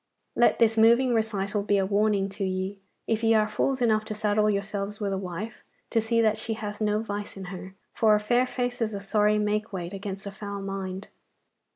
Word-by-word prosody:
Let 240 - +4
this 225 -1 +3
moving 235 +3 +5
recital 210 -2 0
be 205 0 +2
a 195 - +2
warning 200 0 +2
to 200 +1 -5
ye, 190 +1 -2 0.3
if 225 0 -1
ye 225 0 +4
are 215 -1 +3
fools 255 +4 0
enough 215 -2 +3
to 215 - -5
saddle 210 0 +2
yourselves 200 0 -2
with 200 -2 -1
a - - -1
wife, 190 +5 -6 0.3
to 225 - +3
see 230 +1 +2
that 215 -1 +2
she 220 0 -3
hath 210 -1 -6
no 210 +1 +1
vice 205 -2 -5
in 190 - -6
her, 185 +1 -9 0.2
for 215 -2 +4
a - - +2
fair 240 +4 +2
face 245 -1 -3
is 220 -2 0
a - - -3
sorry 210 +1 +2
make 210 +1 0
weight 180 -2 -5
against 195 0 -6
a 200 - -5
foul 200 0 -6
mind. 195 0 -5
210 Hz, 215 wpm, -27 LUFS, 200-220 Hz, 0.3 s, moving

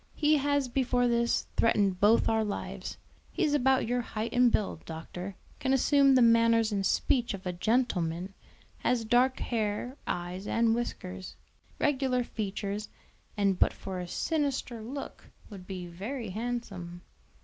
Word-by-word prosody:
He 305 0 +3
has 285 -1 +1
before 245 -1 +1
this 235 0 +1
threatened 200 -5 +2
both 210 +4 +5
our 220 0 +2
lives. 205 -1 -5 0.3
He - - -1
is 300 -3 +2
about 265 -3 +3
your 245 +1 +1
height 225 -1 -4
and 245 -1 +5
build, 200 -7 -1
doctor; 175 +4 -7 0.2
can 265 0 +1
assume 275 0 +5
the 255 - +6
manners 230 -1 +4
and 200 -1 0
speech 235 +4 +1
of 190 0 -12
a 180 - -2
gentleman; 185 -4 0 0.5
has 240 -2 0
dark 245 +3 +3
hair, 225 +3 -2
eyes, 175 +3 -4
and 230 -1 +2
whiskers, 190 -5 -4 0.4
regular 260 -3 +1
features, 205 -1 -4 0.5
and 200 -2 +2
but - - +4
for 190 -1 -6
a 180 - -5
sinister 275 - -1
look 270 +6 -7 0.2
would 185 -3 -10
be 185 -2 -5
very 205 +6 -5
handsome." 195 -6 -5
230 Hz, 150 wpm, -29 LUFS, 195-250 Hz, 0.5 s, the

